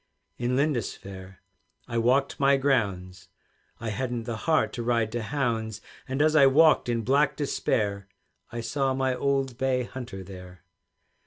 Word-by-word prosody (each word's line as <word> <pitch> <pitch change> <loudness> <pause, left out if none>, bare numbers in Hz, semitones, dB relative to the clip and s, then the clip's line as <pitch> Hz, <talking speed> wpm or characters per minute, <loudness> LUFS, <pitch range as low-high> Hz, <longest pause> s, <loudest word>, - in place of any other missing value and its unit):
In 120 +1 0
Lindisfaire 100 -9 -3 0.4
I 115 - -1
walked 130 +4 +2
my 140 0 +4
grounds, 100 -9 -1 0.5
I 115 - -4
hadn't 120 +1 -3
the 115 0 -4
heart 155 - +2
to 120 - -4
ride 115 -2 0
to 120 +1 -2
hounds; 115 -4 -2 0.3
And 135 +3 0
as 155 0 +3
I 140 -3 +7
walked 150 -1 +5
in 115 -1 0
black 140 +3 +2
despair, 100 -8 -1 0.4
I 115 - -4
saw 135 +3 -1
my 130 -1 +1
old 135 -1 -1
bay 130 -1 +1
hunter 120 -6 -7
there. 90 -1 -12
120 Hz, 150 wpm, -27 LUFS, 110-135 Hz, 0.5 s, I